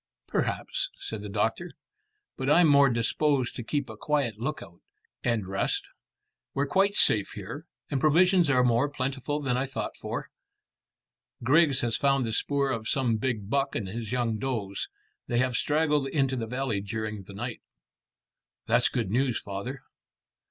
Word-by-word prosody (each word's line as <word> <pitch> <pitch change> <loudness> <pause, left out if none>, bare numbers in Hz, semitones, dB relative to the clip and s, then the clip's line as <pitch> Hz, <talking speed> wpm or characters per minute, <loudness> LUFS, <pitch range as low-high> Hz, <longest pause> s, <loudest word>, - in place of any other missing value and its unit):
"Perhaps," - - -1
said 110 -2 -5
the 105 - -6
doctor; 110 - -1 0.6
"but 130 - -2
I'm 165 +3 +6
more 140 -1 +6
disposed 125 +3 +1
to - - -4
keep 145 +3 -2
a 110 - -8
quiet 130 -3 -1
lookout, 120 - -5 0.4
and 115 -5 0
rest. 95 +1 -1 0.7
We're 140 - +1
quite 195 +7 +2
safe 105 -2 +4
here, 125 - -7 0.2
and 135 -3 0
provisions 175 +2 +4
are 130 -3 +4
more 125 +3 +3
plentiful 140 +1 -2
than 125 -3 0
I 135 +2 0
thought 135 - -4
for. - - -5 1.1
Griggs 145 +2 +4
has 115 -2 0
found 135 -2 +2
the 110 - -2
spoor 140 +3 +1
of 115 -3 -3
some 120 -4 +1
big 110 -4 -2
buck 140 +4 0
and 100 - -2
his 110 +3 -5
young 120 -3 0
does. 110 -7 -2 0.4
They 120 - 0
have 125 0 +1
straggled 150 -1 +2
into 135 -2 +1
the 115 -3 -3
valley 125 -4 -1
during 110 0 -4
the 100 - -11
night." 120 +3 -5 1.0
"That's - - +3
good 110 -6 -2
news, 125 0 +1
father." 100 +7 -6
130 Hz, 160 wpm, -28 LUFS, 110-140 Hz, 1.1 s, I'm